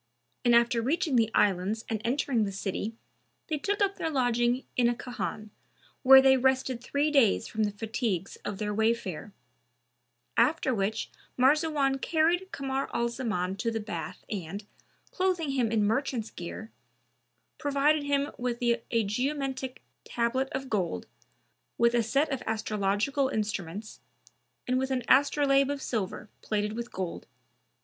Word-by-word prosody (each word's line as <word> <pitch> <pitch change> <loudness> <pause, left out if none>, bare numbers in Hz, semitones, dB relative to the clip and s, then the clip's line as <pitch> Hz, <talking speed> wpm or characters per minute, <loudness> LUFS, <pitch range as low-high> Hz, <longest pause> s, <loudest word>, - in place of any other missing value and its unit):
And 240 -1 +5
after 235 0 +3
reaching 285 +3 0
the 225 -2 +4
Islands 200 +3 +1
and 220 -2 -2
entering 245 -1 +1
the 200 - -2
city 195 +3 -3 0.5
they 305 -2 -1
took 405 +6 0
up 395 0 0
their 320 - -1
lodging 245 -2 +1
in 240 -2 +4
a 240 - 0
khan, 220 -4 -5 0.5
where 265 0 +9
they 265 0 +6
rested 260 -1 +1
three 285 +3 0
days 235 -6 +4
from 220 -1 0
the 205 - -1
fatigues 210 -3 -3
of 200 - -5
their 210 +1 -2
wayfare; 220 -4 -1 1.0
after 260 +3 +3
which 215 +1 -2 0.3
Marzawan 275 0 +3
carried 345 +4 +1
Kamar 270 0 -2
al 235 0 +1
Zaman 215 -7 -2
to 230 - -1
the 225 -1 -2
bath 210 0 -6
and, 200 +1 -5 0.5
clothing 360 -5 0
him 250 -5 +1
in 220 -2 +2
merchant's 230 +1 -1
gear, 220 +6 -7 0.9
provided 290 +1 +2
him 285 0 0
with 245 -1 -1
a 235 -1 +1
geomantic 265 +3 -2 0.2
tablet 250 +3 -1
of 270 -3 -4
gold,[FN#299] 180 - -1 0.7
with 235 0 +4
a 240 - +3
set 275 +7 +1
of 270 - -2
astrological 215 +5 0
instruments 210 -3 -4 0.7
and 255 +1 +2
with 265 0 -1
an 260 -2 -1
astrolabe 275 0 +4
of 285 - -3
silver, 215 -6 -3
plated 210 0 -1
with 235 +1 -5
gold. 185 -2 -5
240 Hz, 145 wpm, -28 LUFS, 215-275 Hz, 1.0 s, where